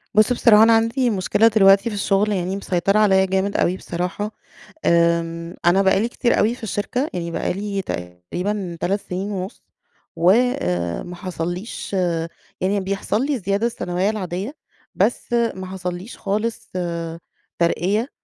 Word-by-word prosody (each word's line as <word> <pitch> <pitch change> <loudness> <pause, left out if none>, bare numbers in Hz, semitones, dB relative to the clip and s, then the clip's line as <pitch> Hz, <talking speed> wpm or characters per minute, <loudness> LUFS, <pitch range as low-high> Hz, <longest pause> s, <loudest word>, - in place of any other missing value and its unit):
بُص 215 +3 +5
بصراحة 220 -3 +6
أنا 230 0 +6
عندي 230 +3 +2
مشكلة 205 +2 +3
دلوقتي 200 0 +5
في 210 - -5
الشغل 200 +1 +1
يعني 185 -1 -1
مسيطرة 195 +1 +1
عليا 190 -3 +4
جامد 190 +1 0
أوي 185 +2 +1
بصراحة، 180 +5 -3 0.5
آمم، 170 0 +1
أنا 175 +3 +5
بقى 190 0 +3
لي 230 +3 0
كتير 240 0 +1
أوي 225 +3 +2
في 250 - -16
الشركة 235 +7 -2
يعني 170 -1 -3
بقى - - -1
لي 200 +1 -3
تقريبًا 170 - -4
3 200 +3 0
سنين 190 +3 -4
ونُص، 190 +3 -5 0.5
و، 170 - +3
آآ، 90 - +1
ما 180 0 -8
حصليش 180 +3 -5 0.7
يعني 195 +2 +1
بيحصل 200 +5 -1
لي 290 0 0
الزيادة 200 0 0
السنوية 185 -4 -1
العادية، 200 - -4 0.4
بس 240 - 0
ما 230 -6 0
حصليش 185 +2 -6
خالص 215 +3 -3 0.9
ترقية 195 +8 +1
195 Hz, 145 wpm, -21 LUFS, 180-215 Hz, 0.9 s, بصراحة